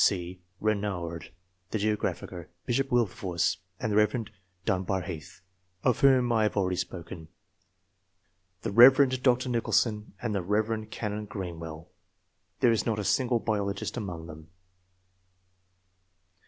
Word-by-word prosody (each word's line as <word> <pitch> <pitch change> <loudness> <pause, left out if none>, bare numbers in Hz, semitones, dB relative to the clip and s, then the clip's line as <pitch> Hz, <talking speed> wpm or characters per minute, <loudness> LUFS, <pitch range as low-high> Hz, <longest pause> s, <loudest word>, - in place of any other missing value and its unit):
C. 90 -1 0 0.2
Renouard, 95 -6 -2 0.4
the 110 - -1
geographer; 100 -4 -2 0.2
Bishop 135 +2 0
Wilberforce, 105 -8 +1 0.2
and 110 - -2
the - - +1
Rev. 105 +2 +2 0.4
Dunbar 95 0 0
Heath, 80 +3 -8 0.4
of 125 - +2
whom 130 -3 +5
I 115 -2 +3
have 105 - +1
abeady 95 -3 +1
spoken; 85 -2 -6 1.4
the - - -2
Rev. 130 +3 +7
Dr. 130 0 +3
Nicholson, 115 -3 0
and 115 -1 -2
the 100 - 0
Rev. 110 +3 -1
Canon 105 -1 -4
Greenwell: 85 -5 -7 0.7
there 120 - +5
is 115 - +1
not 110 -2 -1
a 105 - -2
single 125 +3 +2
biologist 100 -3 -2
among 90 -8 -5
them. 80 0 -11
105 Hz, 125 wpm, -28 LUFS, 90-115 Hz, 1.4 s, Rev